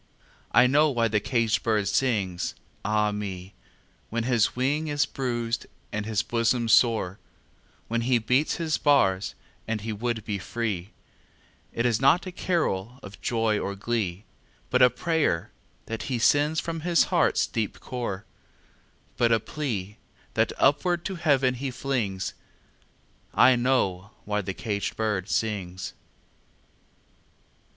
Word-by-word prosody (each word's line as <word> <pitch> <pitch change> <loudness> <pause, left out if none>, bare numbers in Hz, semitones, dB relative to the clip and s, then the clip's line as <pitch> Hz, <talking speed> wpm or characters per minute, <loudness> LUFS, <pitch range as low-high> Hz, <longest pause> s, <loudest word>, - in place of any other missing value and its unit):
I 125 - +6
know 150 +4 +4
why 120 -4 +1
the 105 0 +2
caged 115 0 +1
bird 105 -3 +1
sings, 100 -7 0 0.3
ah 105 0 +1
me, 100 -2 -5 0.6
When 115 0 -1
his 120 -3 +2
wing 145 +5 0
is 145 -1 +1
bruised 120 -3 -2 0.2
and 105 0 -3
his 110 -2 0
bosom 115 0 +1
sore, 110 -5 +3 0.7
When 115 +1 0
he 125 +1 +3
beats 125 +6 +1
his 160 -2 -1
bars 95 -10 +3 0.3
and 110 -1 -2
he 110 +1 -3
would 115 0 -3
be 100 -2 -2
free; 100 -3 -3 0.8
It 115 - -1
is 120 -1 +2
not 145 +8 +4
a 185 - -5
carol 125 - -1
of 100 +1 -11
joy 115 -3 +1
or 100 - -3
glee, 100 -3 -2 0.5
But - - +3
a 125 - +8
prayer 145 - 0 0.3
that 115 -1 -4
he 130 - 0
sends 145 +6 +3
from 165 -1 -3
his 170 +1 +3
heart's - - +3
deep 110 -3 -3
core, 115 -6 -4 0.9
But 120 -1 +3
a 115 - +4
plea, 105 -7 -4 0.4
that - - +2
upward 170 +5 +2
to 195 - -2
Heaven 140 -6 +2
he 135 +2 -4
flings 115 -8 -2 1.0
I 130 0 +7
know 110 -7 +1 0.2
why 105 0 0
the 95 -1 -5
caged 105 -3 -3
bird 105 -3 -1
sings! 95 -5 -2
115 Hz, 140 wpm, -26 LUFS, 105-130 Hz, 1.0 s, a